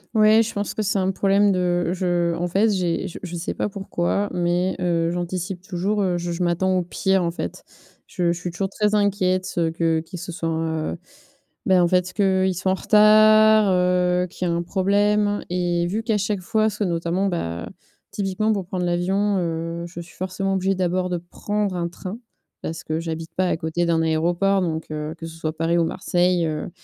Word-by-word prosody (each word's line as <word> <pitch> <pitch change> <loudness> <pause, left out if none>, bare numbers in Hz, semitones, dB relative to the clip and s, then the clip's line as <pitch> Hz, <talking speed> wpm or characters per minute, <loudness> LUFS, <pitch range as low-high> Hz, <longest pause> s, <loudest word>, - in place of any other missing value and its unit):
Oui, 215 +1 +6
je 225 - -5
pense 205 -1 -3
que 215 - -1
c'est 200 0 0
un 190 0 +1
problème 200 +1 +3
de 175 -2 +1
je 175 -2 0
en 175 +1 -2
fait 200 +6 +2
j'ai 185 -3 0
j 175 - -8
je 175 -2 -5
sais 170 0 -4
pas - - -1
pourquoi, 200 0 -2
mais, 175 +1 0
heu, 170 -2 +1
j'anticipe 180 +1 -3
toujours. 195 +3 -1
Heu, 180 -2 0
je 175 0 -3
je 175 +1 -2
m'attends 185 +2 +1
au 180 - +1
pire, 190 +2 0
en 170 - 0
fait. - - -6 0.4
Je 175 -2 0
je 170 - -3
suis 180 -1 -4
toujours 190 +3 -2
très 210 +1 0
inquiète, 190 -3 +1
heu, 165 -1 +1
que 165 -1 +1
qu'il 170 +2 -9
se 175 +1 -6
soit, 165 0 -3
heu 160 0 -2 0.7
bah 185 -2 +4
en 175 - +4
fait 180 0 +1
qu'il 190 -2 +2
soit 185 +2 0
en - - +2
retard, 215 0 +6
heu, 180 0 +2
qu'il 180 +1 -4
y - - 0
ait - - 0
un 170 - 0
problème. 205 +3 +1
Et 175 -1 0
vu 215 +5 -2
qu'à 220 -2 0
chaque 200 -1 -1
fois, 220 +3 +1
soit 210 0 -2
notamment, 170 +2 -1
bah, 85 - -3 0.4
typiquement, 205 +2 0
pour 195 -4 -3
prendre 180 -1 -2
l'avion, 190 +4 +1
heu, 165 0 -3
je 175 0 -9
suis 170 - -14
forcément 190 +1 -2
obligée, 190 +1 +1
d'abord, 185 0 0
de 180 - -1
prendre 205 +3 -3
un 170 -1 -1
train 185 +5 -7 0.4
parce 165 0 -5
que 155 +1 -2
j'habite 165 0 -5
pas 185 0 +1
à - - 0
côté 160 +2 -1
d'un 165 -1 +2
aéroport. 175 +5 +1
Donc, 160 -3 -3
heu, 155 +1 -4
que 165 - -8
ce 165 - -10
soit 155 -1 -3
Paris 165 +1 +1
ou 165 - +3
Marseille, 175 +1 +1
heu, 155 +2 -3
180 Hz, 210 wpm, -22 LUFS, 170-195 Hz, 0.7 s, Oui